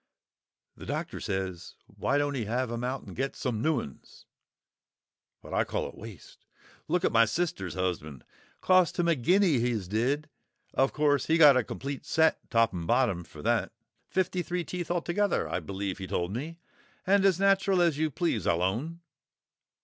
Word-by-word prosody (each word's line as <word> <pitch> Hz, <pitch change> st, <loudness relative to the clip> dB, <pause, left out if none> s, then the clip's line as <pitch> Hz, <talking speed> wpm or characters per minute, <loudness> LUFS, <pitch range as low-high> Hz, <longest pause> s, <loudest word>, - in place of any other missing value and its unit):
"The -, -, -11 dB
doctor -, -, -4 dB
says 95 Hz, -3 st, -4 dB
why 140 Hz, -, -1 dB
don't 145 Hz, 0 st, 0 dB
he 125 Hz, -5 st, -2 dB
have 120 Hz, +3 st, -1 dB
'em 120 Hz, +1 st, -4 dB
out 130 Hz, +2 st, -3 dB
and -, -, -10 dB
get 135 Hz, +1 st, -2 dB
some 120 Hz, -5 st, -2 dB
new 155 Hz, 0 st, +2 dB
'uns? 70 Hz, -, -13 dB, 1.2 s
But -, -, -9 dB
I -, -, +3 dB
call -, -, -3 dB
it -, -, -10 dB
waste. 110 Hz, -5 st, -13 dB, 0.4 s
Look 175 Hz, +2 st, +1 dB
at -, -, +2 dB
my 115 Hz, 0 st, +5 dB
sister's 115 Hz, -, -2 dB
husband: 80 Hz, -7 st, -3 dB, 0.4 s
cost 185 Hz, -2 st, +3 dB
him 175 Hz, -1 st, +1 dB
a 170 Hz, -, +4 dB
guinea 170 Hz, -, +3 dB
his 115 Hz, -5 st, -1 dB
did! 130 Hz, +9 st, 0 dB, 0.5 s
Of 135 Hz, +1 st, +2 dB
course, 145 Hz, -3 st, +1 dB
he 160 Hz, -, +3 dB
got 150 Hz, -4 st, +8 dB
a 130 Hz, -, +3 dB
complete 140 Hz, +4 st, -6 dB
set 160 Hz, 0 st, +1 dB
top 115 Hz, -3 st, +3 dB
and 85 Hz, -2 st, -5 dB
bottom 120 Hz, -7 st, +2 dB
for 75 Hz, -3 st, -13 dB
that, 115 Hz, -4 st, 0 dB, 0.4 s
fifty 185 Hz, -1 st, 0 dB
three 175 Hz, 0 st, -3 dB
teeth 175 Hz, -1 st, -5 dB
altogether 175 Hz, +4 st, 0 dB
I -, -, -2 dB
believe 100 Hz, -1 st, -4 dB
he 95 Hz, -, -5 dB
told 90 Hz, +2 st, -2 dB
me, 155 Hz, +8 st, -5 dB, 0.5 s
and 195 Hz, +1 st, +4 dB
as 190 Hz, -3 st, +3 dB
natural 195 Hz, -1 st, +3 dB
as 170 Hz, -4 st, +2 dB
you 160 Hz, 0 st, +1 dB
please, 140 Hz, -, -1 dB
I'll 85 Hz, +1 st, +2 dB
own. 140 Hz, -, -2 dB
135 Hz, 180 wpm, -28 LUFS, 105-170 Hz, 1.2 s, got